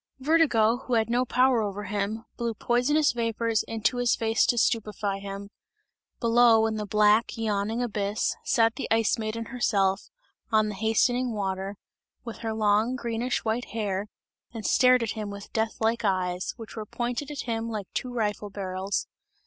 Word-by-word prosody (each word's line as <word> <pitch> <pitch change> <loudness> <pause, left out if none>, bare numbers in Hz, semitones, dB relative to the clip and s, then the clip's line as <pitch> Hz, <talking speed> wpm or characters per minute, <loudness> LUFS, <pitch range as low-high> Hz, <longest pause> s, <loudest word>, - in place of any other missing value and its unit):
Vertigo, 260 -6 +3
who 250 -1 -2
had 225 0 +1
no 245 +1 +2
power 250 -1 +3
over 205 -1 -3
him, 205 +3 -3
blew 235 -2 -2
poisonous 265 +8 +2
vapours 230 -1 0
into 225 +3 0
his 245 -1 +2
face 225 -1 +2
to 240 - +2
stupify 210 -4 0
him; 200 0 -7 0.7
below 230 -1 +5
in 220 -1 -1
the 210 -1 -4
black, 210 +3 +3
yawning 220 +1 -1
abyss, 205 -2 -1
sat 225 -2 +2
the 275 - -3
Ice 225 +1 +2
Maiden 220 +1 -3
herself, 195 -5 +1 0.4
on 215 -1 +3
the - - -4
hastening 230 +4 +1
water, 195 -1 -3 0.5
with 230 - -7
her 225 -1 -3
long 215 +3 +2
greenish 235 0 -2
white 225 +3 -1
hair 205 -2 -3 0.4
and 225 -2 -7
stared 255 -2 +5
at 220 - -2
him 215 -2 -5
with 200 0 -9
death 220 0 -1
like 225 +1 +1
eyes, 185 -2 -1
which 225 -2 -10
were 215 -2 -6
pointed 245 +6 -3
at 290 -2 -4
him 230 -1 -3
like 215 -3 -4
two 250 - -3
rifle 210 -3 -2
barrels. 190 0 -3
225 Hz, 165 wpm, -27 LUFS, 205-240 Hz, 0.7 s, below